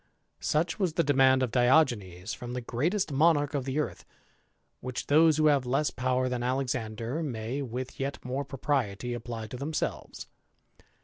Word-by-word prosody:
Such 160 +5 0
was 185 -5 +1
the 170 - +2
demand 130 -2 +4
of 125 - -1
Diogenes 120 - +2
from 120 0 -7
the 125 - -2
greatest 155 - -1
Monarch 145 0 +3
of 140 -3 -1
the 135 +1 -2
earth; 150 - -2 0.8
which 130 0 -5
those 155 +1 +5
who 155 - +3
have 145 -3 +4
less 135 +4 0
power 130 0 0
^n 125 -1 -2
Alexander 125 0 -2
may, 125 -2 -3
with 130 0 -5
yet 135 +1 -2
more 130 +3 -2
propriety, 125 -5 -2
apply 115 -2 -5
to 115 +3 -7
^emselves. 150 +3 -3
130 Hz, 160 wpm, -29 LUFS, 120-145 Hz, 0.8 s, those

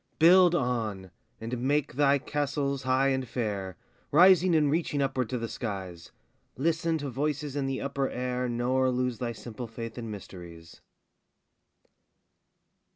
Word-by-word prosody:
Build 175 +2 +6
on, 110 - -2 0.3
and 115 +2 -4
make 140 +2 0
thy 140 +1 +3
castles 140 -1 -2
high 130 +1 +2
and 130 -1 -1
fair, 100 -7 -3 0.3
Rising 180 +2 +6
and 150 -3 +3
reaching 155 -2 0
upward 130 -4 0
to 125 - -2
the 115 -1 -3
skies; 95 -8 -6 0.5
Listen 165 +3 0
to 145 -2 -4
voices 145 +2 -2
in 140 -2 -1
the 135 -1 -2
upper 140 -1 -1
air, 125 0 -2
Nor 125 +2 +1
lose 125 -1 -1
thy 120 -2 -2
simple 115 +1 -8
faith 115 +1 -7
in 115 -1 -6
mysteries. 85 -5 -10
130 Hz, 140 wpm, -28 LUFS, 115-145 Hz, 0.5 s, Build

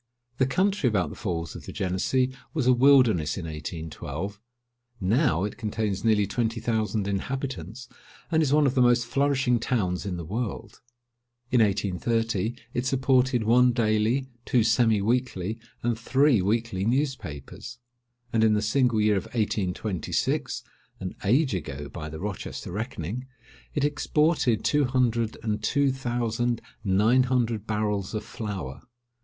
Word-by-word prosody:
The 130 - +4
country 185 -1 +2
about 95 -8 0
the - - -8
Falls 85 -6 -4
of - - -10
the - - -5
Genessee 125 +8 0 0.2
was 150 -6 0
a 130 - +6
wilderness 120 - +4
in 90 - -5
1812. 80 +4 -6 0.6
Now 110 - +2
it 105 - -4
contains 105 -4 -2
nearly 110 -2 +3
twenty 115 +3 -1
thousand 110 -3 -1
inhabitants, 115 - -4 0.4
and 160 -1 +3
is 145 -4 +1
one 150 0 +4
of 130 - +2
the 130 - +3
most 120 0 +4
flourishing 135 -3 +1
towns 95 -7 -1
in 90 -2 -3
the 85 - -6
world. 110 +5 -5 0.7
In 125 -2 +4
1830, 105 +2 0 0.2
it 120 +1 -1
supported 130 -2 +2
one 125 +3 +5
daily, 115 +3 +1 0.2
two 120 -1 +2
semi 115 -2 +3
weekly, 115 -3 -1 0.2
and 120 -1 0
three 130 -1 +3
weekly 105 -1 0
newspapers; 120 - -3 0.6
and 110 -1 +3
in 110 -1 +4
the 105 - +1
single 120 +1 +2
year 105 -1 +3
of 95 - -3
1826, 100 -4 -1 0.4
(an 95 -1 -5
age 130 +6 +3
ago, 75 -5 -4
by 80 -3 -7
the 80 0 -7
Rochester 100 -2 -5
reckoning,) 110 +3 -4 0.5
it 145 - +1
exported 150 -4 +1
two 145 -1 +3
hundred 120 -3 +1
and 110 -2 -1
two 140 +4 +2
thousand 120 -2 -1 0.2
nine 105 +6 +4
hundred 115 -4 0
barrels 105 -2 -1
of 105 - -2
flour. 100 - -6
115 Hz, 145 wpm, -26 LUFS, 100-125 Hz, 0.7 s, a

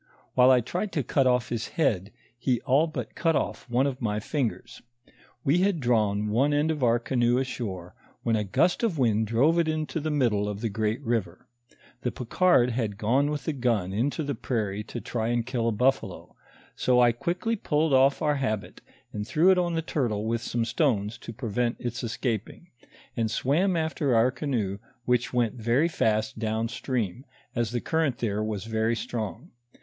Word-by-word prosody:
While 125 0 +6
I 130 -1 +6
tried 180 - -3
to 145 - 0
cut 135 +2 +2
off 125 -2 +2
his 120 -1 -2
head, 105 - +1 0.2
he 120 0 0
all 140 +5 +3
but 155 - -5
cut 165 -2 +1
off 135 - -2
one 125 +3 +2
of 135 -2 -3
my 105 -2 0
fingers. 125 0 -3 0.6
We 150 +6 +3
had 190 -2 +2
drawn 105 -5 +1
one 135 +7 +2
end 150 +2 +2
of 150 -3 -3
our 120 -1 +4
canoe 120 0 +1
ashore, 100 -9 -4 0.3
when 115 - +2
a 105 - 0
gust 105 - +1
of 220 -9 0
wind 110 -4 +2
drove 140 +10 +3
it 165 - +2
into 155 0 -2
the 155 +1 -2
middle 115 -9 +1
of 105 0 -5
the 115 - -1
great 110 +5 -1
river; 110 -7 -2 0.6
the 125 - 0
Picard 125 +1 +2
had 110 -4 -2
gone 130 +7 +2
with 150 -1 -4
the 160 - -1
gun 115 -8 0
into 140 +9 0
the 140 0 -2
prairie 105 -4 -2
to 120 - -6
try 115 -1 -3
and 120 -1 0
kill 120 -2 -1
a - - +2
buffalo; 115 -3 -1 0.4
so 125 -1 +2
I 120 -1 +6
quickly 175 - -2
pulled 155 -6 0
off 135 +2 +4
our 150 -1 +2
habit, 110 -7 -3 0.3
and 105 0 -4
threw 165 +8 +4
it 185 - +4
on 175 -1 0
the 165 - -1
turtle 115 -10 -1
with 115 0 -1
some 120 -1 -1
stones 115 -5 0
to - - -8
prevent 120 +1 -1
its 120 +1 -4
escaping, 115 - -3 0.4
and 115 -2 0
Bwam 165 - +1
after 160 -5 0
our 115 +3 +4
canoe 115 -9 -2 0.3
which 125 -1 +1
went 120 -1 0
very 120 +8 +3
fast 110 -9 0
down 110 0 -1
stream, 120 -3 -3 0.3
as 120 -2 0
the 120 +1 -2
current 160 -6 0
there 105 -2 -1
was 105 -3 -3
very 110 +1 0
strong. 110 - -5
120 Hz, 190 wpm, -27 LUFS, 110-145 Hz, 0.6 s, While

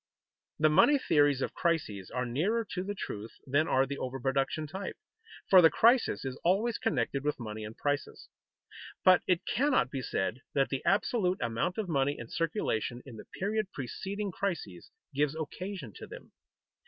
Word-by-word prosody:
The 155 - +4
money 285 - +5
theories 145 - +3
of - - -3
crises 110 - -1
are 125 +1 -2
nearer 190 - 0
to 180 - -2
the 205 +1 -4
truth 110 - -6
than 145 +4 +2
are 130 +1 +3
the 140 +1 -5
over 130 +1 -4
production 135 +4 0
type, 190 +6 -6 0.5
for 185 -2 +8
the 165 - +8
crisis 235 - +3
is 130 -1 -5
always 210 +7 +2
connected 135 0 -1
with 150 -1 -1
money 110 -2 -6
and 105 +1 -8
prices. 145 0 -2 0.8
But 185 -1 +7
it 180 -1 +1
cannot 260 - +2
be 135 - -3
said 110 0 -2 0.2
that 135 -1 +2
the 135 - -3
absolute 195 -2 +2
amount 115 +10 -1
of 215 -3 -2
money 145 -3 +1
in 120 - -8
circulation 130 - -2
in 125 -5 -10
the - - -10
period 210 +1 -2
preceding 195 - -4
crises 160 - -4 0.2
gives 145 +1 +1
occasion 160 - -6
to - - -9
them. - - -11
150 Hz, 170 wpm, -30 LUFS, 130-190 Hz, 0.8 s, for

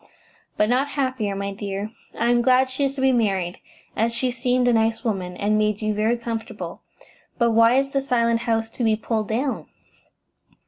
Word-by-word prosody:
"But 210 - +3
not 255 +4 +2
happier, 255 -7 -1
my 200 0 -3
dear. 200 +1 -4 0.3
I 235 +1 +2
am 240 0 +3
glad 255 +1 +3
she 275 +2 0
is 275 0 -2
to 270 - -4
be 265 0 +4
married, 195 -7 0 0.4
as 225 +2 +1
she 250 +2 -1
seemed 250 0 +1
a 245 - +4
nice 225 0 +1
woman, 185 -6 -2
and 210 +1 +1
made 210 -1 +1
you 215 -1 -1
very 220 +3 +1
comfortable. 230 -1 -6 0.6
But 235 -1 +3
why 230 +2 +5
is 275 +1 +1
the 275 - +1
Silent 235 -3 +1
House 225 -1 -1
to 245 - -4
be 220 -1 +3
pulled 215 -1 -2
down?" 255 +5 -2
230 Hz, 190 wpm, -23 LUFS, 215-250 Hz, 0.6 s, why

